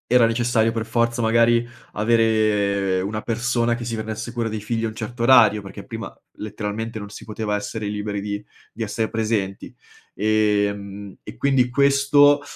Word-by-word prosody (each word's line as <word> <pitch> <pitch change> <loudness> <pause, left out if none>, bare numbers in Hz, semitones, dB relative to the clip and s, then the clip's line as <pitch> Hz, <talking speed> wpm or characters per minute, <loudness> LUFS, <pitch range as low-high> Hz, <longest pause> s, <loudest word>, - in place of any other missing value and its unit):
Era 125 -2 +6
necessario 115 -1 +1
per 115 -1 -2
forza, 115 +1 0
magari, 115 +1 +3 0.3
avere 105 -4 +2
una 105 +3 -3
persona 120 0 0
che 120 -1 -6
si 115 - -3
prendesse 110 +1 -5
cura 115 -1 -1
dei 110 0 -4
figli 115 +2 -2
un 110 - -3
certo 115 +2 -6
orario, 115 -5 +6
perché 95 - -10
prima - - -7 0.2
letteralmente 110 +2 -5
non 105 - -7
si 100 - -11
poteva 105 -1 -3
essere 105 +1 -5
liberi 105 0 -3
di 100 +1 -4 0.3
di 115 - -5
essere 110 +1 -2
presenti, 105 -3 -2 0.4
ehm, 100 -1 0
e - - -10
quindi 135 -3 +2
questo, 140 +2 +4
110 Hz, 160 wpm, -22 LUFS, 105-120 Hz, 0.4 s, Era